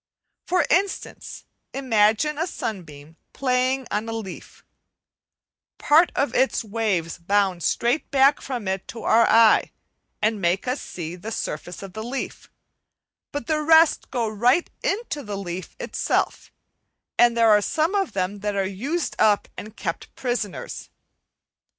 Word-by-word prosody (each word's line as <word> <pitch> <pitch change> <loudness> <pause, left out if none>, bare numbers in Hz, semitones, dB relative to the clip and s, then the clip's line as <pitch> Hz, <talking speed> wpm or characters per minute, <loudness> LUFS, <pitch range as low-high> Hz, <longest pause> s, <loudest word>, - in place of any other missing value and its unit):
For 365 0 +2
instance, 390 +2 -1 0.3
imagine 255 +3 +2
a 330 - 0
sunbeam 160 - -7 0.2
playing 255 0 0
on 215 +2 -2
a - - -3
leaf: 220 -4 -8 1.1
part 320 +4 +4
of 280 - 0
its 260 -2 +2
waves 200 -7 -2
bound 190 0 +1
straight 240 - 0
back 275 +1 +4
from 245 -7 -5
it 190 0 -2
to 230 - -8
our 230 +1 +4
eye 225 -1 +5 0.5
and 215 -1 0
make 175 +6 0
us 255 +3 -1
see 170 -1 -6
the 210 +5 -7
surface 175 -2 -5
of 195 -2 -9
the 220 - -6
leaf, 250 +4 -5 0.8
but 290 -4 -4
the 305 +2 0
rest 320 +1 +4
go 240 -3 -1
right 240 - +2
into 395 -8 -2
the 205 -5 -5
leaf 185 -1 -6
itself, - - -1 0.7
and 240 -1 +5
there 220 -3 +5
some 315 - 0
of 390 - 0
them 195 +1 -2
are 200 -2 0
used 255 - -3
up 210 -2 +3
and 215 +1 -9
kept 165 -4 -5
prisoners. 240 -6 -4
225 Hz, 140 wpm, -23 LUFS, 195-275 Hz, 1.1 s, eye